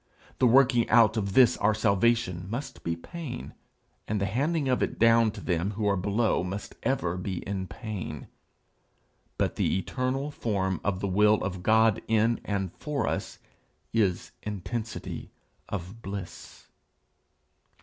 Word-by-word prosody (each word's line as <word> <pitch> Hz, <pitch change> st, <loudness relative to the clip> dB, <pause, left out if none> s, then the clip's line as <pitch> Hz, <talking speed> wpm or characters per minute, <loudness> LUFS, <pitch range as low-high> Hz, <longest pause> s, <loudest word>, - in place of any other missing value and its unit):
The 125 Hz, -, +5 dB
working 125 Hz, -1 st, +5 dB
out 115 Hz, -2 st, +6 dB
of 100 Hz, -3 st, -1 dB
this 125 Hz, 0 st, +6 dB
our 105 Hz, +1 st, +2 dB
salvation 100 Hz, -4 st, +1 dB
must 120 Hz, +7 st, -5 dB
be 85 Hz, -, -1 dB
pain, 130 Hz, -, -7 dB, 0.5 s
and 105 Hz, 0 st, -1 dB
the 100 Hz, -, 0 dB
handing 140 Hz, -, 0 dB
of 130 Hz, -1 st, +1 dB
it -, -, -1 dB
down 115 Hz, 0 st, +5 dB
to -, -, -8 dB
them 90 Hz, +3 st, -1 dB
that 110 Hz, -, -2 dB
are 100 Hz, -1 st, +3 dB
below 100 Hz, +3 st, +1 dB
must 95 Hz, +3 st, -5 dB
ever 90 Hz, -9 st, 0 dB
be 90 Hz, -1 st, -4 dB
in 95 Hz, -2 st, -3 dB
pain; 100 Hz, -, -6 dB, 1.1 s
but -, -, 0 dB
the -, -, +1 dB
eternal 130 Hz, +7 st, -2 dB
form 95 Hz, -, -1 dB
of 100 Hz, -1 st, -1 dB
the 100 Hz, -, 0 dB
will 105 Hz, +3 st, +4 dB
of 90 Hz, -1 st, -3 dB
God 110 Hz, +2 st, +4 dB
in 115 Hz, +1 st, +2 dB
and 95 Hz, -3 st, -2 dB
for 150 Hz, -2 st, -2 dB
us, -, -, -3 dB, 0.6 s
is 100 Hz, -6 st, +1 dB
intensity 105 Hz, +3 st, -5 dB, 0.4 s
of 100 Hz, +3 st, -6 dB
bliss. 100 Hz, -3 st, -8 dB
105 Hz, 145 wpm, -28 LUFS, 95-115 Hz, 1.1 s, out